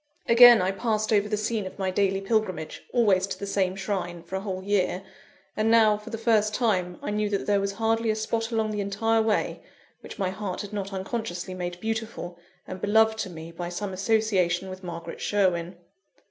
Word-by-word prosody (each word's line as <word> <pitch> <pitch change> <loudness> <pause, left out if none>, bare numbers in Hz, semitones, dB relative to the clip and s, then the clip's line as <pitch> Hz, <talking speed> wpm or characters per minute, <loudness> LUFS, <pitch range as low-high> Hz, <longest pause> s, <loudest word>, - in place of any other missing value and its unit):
Again 235 -3 +8
I 185 - +1
passed 215 +1 -1
over 205 0 +2
the 210 - 0
scene 215 -1 -2
of 185 - -10
my 190 -2 -1
daily 195 0 +1
pilgrimage, 195 -6 -1
always 200 -6 +3
to 195 - -5
the 200 - -5
same 190 -2 0
shrine, 185 -4 -3
for 190 - -7
a 190 - -2
whole 190 -2 -4
year; 190 -2 0 0.5
and 215 +1 +1
now, 220 -2 +5
for 210 +2 -9
the 225 - -4
first 215 -2 +2
time, 185 -7 0
I - - -2
knew 210 0 0
that 200 -1 -1
there 205 -1 +2
was 200 0 -2
hardly 225 +2 0
a 215 - +2
spot 225 +1 -2
along 220 -1 0
the 210 -1 -2
entire 225 +3 +1
way, 220 -1 0 0.4
which - - -10
my 190 -3 -1
heart 190 -1 -4
had 205 0 -8
not 200 -1 -4
unconsciously 190 -2 -4
made 175 -1 -5
beautiful 220 -5 -4 0.3
and 185 - -8
beloved 220 +1 +3
to 205 - -2
me 165 -1 -9
by 175 +1 -5
some 190 +2 -4
association 190 -3 +1
with 185 0 -9
Margaret 170 -1 -7
Sherwin. 180 -3 0
200 Hz, 200 wpm, -26 LUFS, 185-220 Hz, 0.5 s, Again